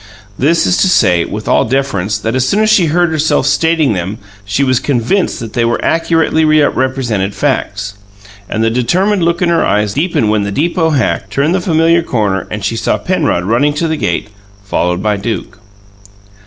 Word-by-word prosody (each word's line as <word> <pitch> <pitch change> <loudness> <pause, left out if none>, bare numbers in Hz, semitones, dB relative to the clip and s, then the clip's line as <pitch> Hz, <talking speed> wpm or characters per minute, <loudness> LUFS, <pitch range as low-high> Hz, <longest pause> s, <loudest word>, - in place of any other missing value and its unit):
This 160 +8 +2
is 180 - +2
to - - +3
say, 90 - +3
with 105 +1 -6
all - - +3
deference, 120 -8 -1
that 115 - -3
as 130 0 0
soon 210 - +1
as 215 - +2
she 185 -6 +4
heard 170 +2 +1
herself 160 0 +1
stating 160 -6 +2
them 95 +3 -4 0.3
she 100 +7 -1
was 130 -2 +2
convinced 145 - 0
that 115 -2 -7
they 120 - 0 0.2
accurately 165 -1 +1
represented 130 -9 +1
facts. 100 -8 -2 0.6
And 110 - -1
the 115 - +1
determined 180 - +1
look 170 +1 +1
in 175 - +2
her 170 - +2
eyes 105 0 0
deepened 145 -8 0
when 105 -1 +1
the 100 0 -3
"deepoe 160 - 0
hack" 130 - -1
turned 145 +5 0
the 190 - 0
familiar 165 0 +2
corner 105 - -1
and 105 -2 -5
she 115 - -1
saw 115 - 0
Penrod 160 - -1
running 120 +9 +1
to 165 +2 -1
the 160 - -1
gate, 140 - -2 0.3
followed 90 -2 -1
by 105 -1 +1
Duke. 100 -2 -5
130 Hz, 185 wpm, -13 LUFS, 105-165 Hz, 0.6 s, she